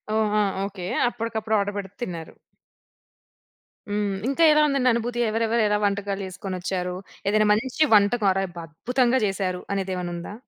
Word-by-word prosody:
ఓహ్! 215 Hz, -1 st, +1 dB
ఆ! -, -, +3 dB, 0.2 s
ఓకె, 195 Hz, -3 st, -6 dB, 0.2 s
అప్పటికప్పుడు 220 Hz, -2 st, -2 dB
ఆర్డర్ 200 Hz, 0 st, -2 dB
పెడితే 200 Hz, 0 st, -6 dB
తిన్నారు. 170 Hz, -8 st, -5 dB, 1.6 s
హ్మ్. 205 Hz, -1 st, -1 dB
ఇంకా 275 Hz, +5 st, +2 dB
ఎలా 300 Hz, 0 st, +5 dB
ఉందండి 275 Hz, -3 st, +2 dB
అనుభూతి? 240 Hz, +1 st, -2 dB
ఎవరెవరు 225 Hz, +1 st, +1 dB
ఎలా 210 Hz, 0 st, +2 dB
వంటకాలు 200 Hz, 0 st, -1 dB
చేసుకొనొచ్చారు. 185 Hz, -1 st, -4 dB, 0.3 s
ఏదైనా 215 Hz, +1 st, +3 dB
మంచి 255 Hz, +7 st, +1 dB
వంటకం 205 Hz, +1 st, +3 dB
అరే! 195 Hz, 0 st, 0 dB, 0.2 s
అద్భుతంగా 245 Hz, -, +1 dB
చేసారు 190 Hz, -2 st, -2 dB
అనేది 195 Hz, -1 st, -2 dB
ఏమైనుందా? 175 Hz, +1 st, -5 dB
205 Hz, 140 wpm, -24 LUFS, 190-230 Hz, 1.6 s, ఎలా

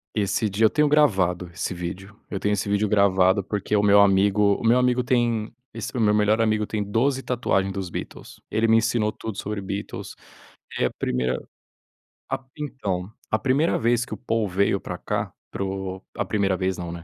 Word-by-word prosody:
Esse 105 Hz, +1 st, 0 dB
dia 105 Hz, +3 st, +2 dB
eu -, -, +6 dB
tenho 150 Hz, +3 st, +2 dB
gravado 95 Hz, -, +2 dB
esse 90 Hz, -, -3 dB
vídeo, 90 Hz, +3 st, -6 dB, 0.2 s
eu 100 Hz, -, -3 dB
tenho 105 Hz, +2 st, 0 dB
esse 105 Hz, -1 st, -1 dB
vídeo 100 Hz, +1 st, +1 dB
gravado 100 Hz, -1 st, +4 dB
porque 100 Hz, +1 st, -4 dB
o -, -, +3 dB
meu 100 Hz, 0 st, +6 dB
amigo 100 Hz, +1 st, +4 dB
o -, -, -7 dB
meu 115 Hz, +2 st, +5 dB
amigo 125 Hz, 0 st, +2 dB
tem 120 Hz, -3 st, 0 dB, 0.2 s
esse -, -, -5 dB
meu 105 Hz, -3 st, +3 dB
melhor 105 Hz, +1 st, +3 dB
amigo 110 Hz, -1 st, +1 dB
tem 105 Hz, -2 st, -2 dB
12 130 Hz, +6 st, 0 dB
tatuagem 100 Hz, -6 st, 0 dB
dos 95 Hz, -2 st, -4 dB
Beatles. -, -, -8 dB
Ele 115 Hz, +1 st, +2 dB
me 110 Hz, -, +5 dB
ensinou 115 Hz, -1 st, +2 dB
tudo 110 Hz, -3 st, -7 dB
sobre 105 Hz, 0 st, -4 dB
Beatles. 100 Hz, +1 st, -6 dB, 0.6 s
É -, -, +2 dB
a -, -, 0 dB
primeira 65 Hz, 0 st, -1 dB, 0.9 s
a -, -, 0 dB
p 130 Hz, -, -25 dB
então, 100 Hz, -10 st, -3 dB, 0.2 s
a 110 Hz, -, +2 dB
primeira 135 Hz, +5 st, +2 dB
vez 120 Hz, +1 st, +2 dB
que -, -, -8 dB
o -, -, -5 dB
Paul 115 Hz, -3 st, -1 dB
veio 100 Hz, +1 st, +1 dB
para -, -, -6 dB
cá -, -, -3 dB, 0.2 s
para -, -, -5 dB
o 95 Hz, -1 st, -4 dB, 0.2 s
a -, -, +1 dB
primeira 100 Hz, -3 st, +1 dB
vez 95 Hz, 0 st, -1 dB
não, 85 Hz, -1 st, -5 dB
né. 85 Hz, -1 st, -8 dB
105 Hz, 200 wpm, -24 LUFS, 95-115 Hz, 0.9 s, eu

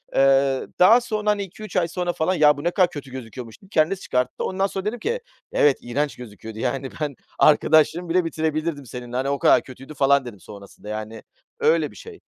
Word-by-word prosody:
Eee, 135 Hz, -1 st, +3 dB
daha 225 Hz, +7 st, +7 dB
sonra, 215 Hz, -3 st, -2 dB
hani, 205 Hz, -1 st, +1 dB
2-3 210 Hz, +3 st, -10 dB
ay 175 Hz, -2 st, +2 dB
sonra 175 Hz, 0 st, -2 dB
falan, 170 Hz, +4 st, 0 dB
"Ya, 150 Hz, -4 st, +4 dB
bu 145 Hz, -, -7 dB
ne 175 Hz, -, +1 dB
kadar 185 Hz, -2 st, +3 dB
kötü 140 Hz, -3 st, -9 dB
gözüküyormuş" 120 Hz, -, -9 dB
dedi, 195 Hz, -, -19 dB
kendisi 175 Hz, +3 st, +1 dB
çıkarttı. 125 Hz, 0 st, -1 dB
Ondan 195 Hz, +1 st, 0 dB
sonra 190 Hz, 0 st, -5 dB
dedim 230 Hz, +3 st, -2 dB
ki, 475 Hz, -, -2 dB, 0.3 s
"Evet, 145 Hz, -2 st, +3 dB
iğrenç 140 Hz, +5 st, -2 dB
gözüküyordu, 110 Hz, -2 st, -10 dB
yani, 130 Hz, +2 st, -2 dB
ben 145 Hz, -3 st, -2 dB, 0.2 s
arkadaşlığımı 155 Hz, +3 st, +4 dB
bile 180 Hz, 0 st, +2 dB
bitirebilirdim 155 Hz, -2 st, -2 dB
seninle, 125 Hz, 0 st, -8 dB
hani, 135 Hz, +2 st, -1 dB
o 140 Hz, -1 st, -1 dB
kadar -, -, +5 dB
kötüydü" 135 Hz, +3 st, -11 dB
falan 140 Hz, -1 st, +3 dB
dedim 105 Hz, -6 st, -9 dB
sonrasında, 100 Hz, +1 st, -12 dB
yani, 110 Hz, +1 st, -6 dB, 0.4 s
öyle 465 Hz, +1 st, +2 dB
bir -, -, -17 dB
şey. 445 Hz, -3 st, -11 dB
150 Hz, 200 wpm, -23 LUFS, 130-185 Hz, 0.4 s, daha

